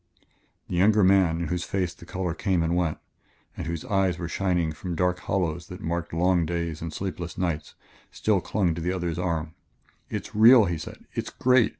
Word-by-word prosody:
The 90 Hz, -, -2 dB
younger 105 Hz, +3 st, +5 dB
man, 90 Hz, -3 st, +4 dB
in 85 Hz, -, -2 dB
whose 90 Hz, +1 st, -1 dB
face 90 Hz, -3 st, -1 dB
the 85 Hz, -, -15 dB
color 90 Hz, -3 st, -2 dB
came 90 Hz, -2 st, 0 dB
and 85 Hz, +1 st, 0 dB
went, 85 Hz, -3 st, 0 dB, 0.6 s
and -, -, -5 dB
whose 85 Hz, -2 st, -4 dB
eyes 95 Hz, -3 st, +1 dB
were 85 Hz, -, -4 dB
shining 90 Hz, -3 st, 0 dB
from 85 Hz, +3 st, -5 dB
dark 90 Hz, +1 st, +1 dB
hollows 85 Hz, -3 st, -2 dB
that 90 Hz, -, -8 dB
marked 85 Hz, 0 st, -3 dB
long 90 Hz, +1 st, +2 dB
days 85 Hz, -1 st, -3 dB
and 80 Hz, 0 st, -4 dB
sleepless 90 Hz, -1 st, -5 dB
nights, 85 Hz, -4 st, -2 dB, 0.3 s
still 105 Hz, -4 st, +1 dB
clung 90 Hz, -4 st, 0 dB
to 85 Hz, -, -5 dB
the 90 Hz, +3 st, 0 dB
other's 85 Hz, -2 st, -2 dB
arm. 80 Hz, -3 st, -2 dB, 0.6 s
"It's -, -, -5 dB
real," 115 Hz, +1 st, +8 dB
he 85 Hz, -3 st, -2 dB
said; -, -, -9 dB
"it's -, -, -3 dB
great! 125 Hz, -2 st, +3 dB
90 Hz, 195 wpm, -26 LUFS, 85-95 Hz, 0.6 s, real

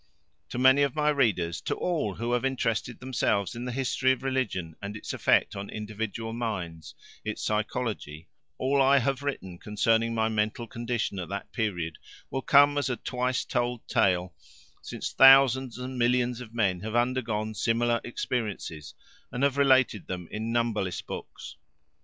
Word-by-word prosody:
To -, -, -5 dB
many 130 Hz, +2 st, +5 dB
of 140 Hz, 0 st, +1 dB
my 150 Hz, 0 st, +2 dB
readers, 105 Hz, -, +1 dB
to -, -, -2 dB
all 155 Hz, -, -1 dB
who 115 Hz, +4 st, -3 dB
have 125 Hz, 0 st, +1 dB
interested 125 Hz, -3 st, -1 dB
themselves 110 Hz, -6 st, 0 dB
in 120 Hz, +1 st, -6 dB
the 125 Hz, -, -3 dB
history 130 Hz, +1 st, +1 dB
of 130 Hz, -, -8 dB
religion 110 Hz, -12 st, -2 dB
and 100 Hz, +1 st, -5 dB
its -, -, -6 dB
effect -, -, +2 dB
on 100 Hz, 0 st, -6 dB
individual 110 Hz, +1 st, -5 dB
minds 95 Hz, -9 st, -5 dB, 0.3 s
its 110 Hz, -1 st, -4 dB
psychology 105 Hz, -7 st, -3 dB, 0.3 s
all 135 Hz, +1 st, +2 dB
I 135 Hz, +1 st, +5 dB
have 135 Hz, +1 st, 0 dB
written 95 Hz, -11 st, -4 dB
concerning 115 Hz, +2 st, +1 dB
my 110 Hz, -1 st, +2 dB
mental 110 Hz, +1 st, -1 dB
condition 115 Hz, -3 st, -3 dB
at 85 Hz, -3 st, -5 dB
that 100 Hz, 0 st, -5 dB
period, 90 Hz, -8 st, -2 dB, 0.3 s
will 135 Hz, -, -2 dB
come 145 Hz, +1 st, +5 dB
as 140 Hz, -2 st, -1 dB
a 125 Hz, -, 0 dB
twice 125 Hz, 0 st, -1 dB
told 120 Hz, -1 st, -2 dB
tale, 90 Hz, -7 st, +1 dB, 0.5 s
since -, -, -5 dB
thousands 135 Hz, -2 st, +6 dB
and 125 Hz, 0 st, -5 dB
millions 120 Hz, 0 st, +1 dB
of 115 Hz, -3 st, -10 dB
men 100 Hz, -6 st, +1 dB
have 110 Hz, +4 st, -5 dB
undergone 120 Hz, -3 st, 0 dB
similar 115 Hz, +2 st, +1 dB
experiences 105 Hz, -11 st, -4 dB, 0.4 s
and 125 Hz, -, -2 dB
have 140 Hz, -1 st, +3 dB
related 130 Hz, -6 st, +3 dB
them 90 Hz, -2 st, -5 dB
in 110 Hz, +2 st, -3 dB
numberless 115 Hz, -6 st, -1 dB
books. 75 Hz, -, -8 dB
115 Hz, 160 wpm, -27 LUFS, 105-130 Hz, 0.5 s, thousands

